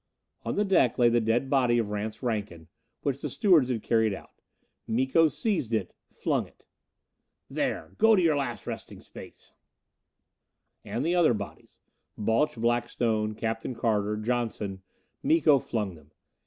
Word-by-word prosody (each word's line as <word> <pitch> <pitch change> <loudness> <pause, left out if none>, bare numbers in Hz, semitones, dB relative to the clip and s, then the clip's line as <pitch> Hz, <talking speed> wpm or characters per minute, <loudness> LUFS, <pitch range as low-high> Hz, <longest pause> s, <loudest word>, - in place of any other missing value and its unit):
On - - -3
the 205 - +1
deck 180 - +3
lay 120 -1 +5
the 120 0 +2
dead 115 +4 +1
body 125 -3 +3
of 110 -3 -1
Rance 105 +4 -4
Rankin, 105 -9 -3 0.3
which 140 -1 -1
the 150 - -3
stewards 160 - +4
had 115 -4 -2
carried 110 -3 +2
out. - - -13 0.6
Miko 130 +7 +3
seized 155 - -1
it, 100 -5 -2 0.2
flung - - -1
it. - - -26 0.9
"There! - - -2
Go 225 0 +6
to 190 - +3
your 160 -3 +3
last 135 -4 -3
resting - - -6
place!" - - -12 1.3
And - - -3
the 170 - +1
other 170 -9 +4
bodies. 100 -1 -9 0.4
Balch 115 +8 +1
Blackstone, 115 -2 0
Captain 115 +3 -3
Carter, 105 -3 0
Johnson 110 -4 -2 0.4
Miko 275 - +4
flung 105 -6 -3
them. 75 -2 -17
120 Hz, 145 wpm, -28 LUFS, 110-140 Hz, 1.3 s, Go